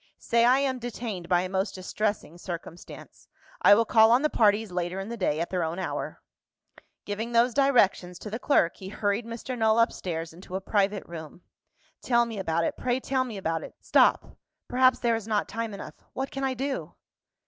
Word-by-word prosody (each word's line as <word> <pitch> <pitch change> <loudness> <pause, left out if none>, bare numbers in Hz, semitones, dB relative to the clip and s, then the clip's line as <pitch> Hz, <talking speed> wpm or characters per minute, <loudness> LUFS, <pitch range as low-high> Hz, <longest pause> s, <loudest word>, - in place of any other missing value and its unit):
"Say 235 0 +2
I 250 +2 +5
am 270 -2 0
detained 225 -7 -5
by 175 -1 +4
a 185 - -3
most 190 +1 -2
distressing 190 -2 -3
circumstance; 175 -1 -9 0.3
I 205 - +8
will 230 +2 +3
call 220 0 +6
on 245 +4 +4
the 305 - +2
parties 210 -1 +3
later 180 +1 -2
in 195 +3 -5
the 235 - -4
day, 170 -8 0
at 170 - -3
their 180 -1 0
own 165 +2 -3
hour." 190 - -4 0.8
Giving 220 +3 -4
those 235 +1 +4
directions 220 -10 +2
to 210 - -8
the 225 - -3
clerk, 190 - +2
he 190 - -8
hurried 205 +3 -1
Mr. 235 +2 -5
Null 220 -1 +2
upstairs 165 -8 -1
into 180 +2 -9
a - - 0
private 200 0 0
room. 165 0 -10 0.6
"Tell 235 -1 +3
me 225 -3 -6
about 170 -3 0
it; - - -1
pray 250 0 0
tell 260 0 0
me 230 -5 -6
about 165 -4 -2
it. - - -10
Stop! - - +2 0.3
Perhaps, 255 +1 +4
there 235 -2 +1
is 225 -1 -5
not 215 -2 0
time 225 +1 -4
enough. 200 - -8 0.2
What 265 +1 -4
can 275 - -4
I 265 -1 0
do?" 270 +2 -4
215 Hz, 200 wpm, -27 LUFS, 185-240 Hz, 0.8 s, I